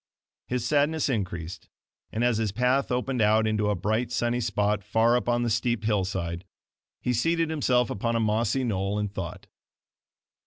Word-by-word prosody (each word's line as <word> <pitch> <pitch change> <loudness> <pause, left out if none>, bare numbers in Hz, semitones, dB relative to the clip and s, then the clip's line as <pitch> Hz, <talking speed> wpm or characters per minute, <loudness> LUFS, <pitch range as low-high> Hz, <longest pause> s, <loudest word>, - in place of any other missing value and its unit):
His 125 -2 -2
sadness 150 +3 +2
increased; 90 -7 -4 0.4
and 115 - -1
as 120 -3 +2
his 110 -3 0
path 125 +5 +1
opened 125 0 -1
out 110 +1 +4
into 105 -1 +1
a 105 - +1
bright, 110 +6 -1
sunny 120 0 0
spot 105 -2 0
far 115 +3 +3
up 120 -1 0
on 120 0 +2
the 120 - 0
steep 115 +1 0
hillside, 95 -5 -1 0.6
he 125 - +1
seated 165 +6 +1
himself 125 -6 +1
upon 115 +4 -1
a - - +2
mossy 110 +4 +1
knoll 100 -3 -1
and 105 -1 -2
thought. 85 -4 -6
115 Hz, 165 wpm, -26 LUFS, 105-125 Hz, 0.6 s, out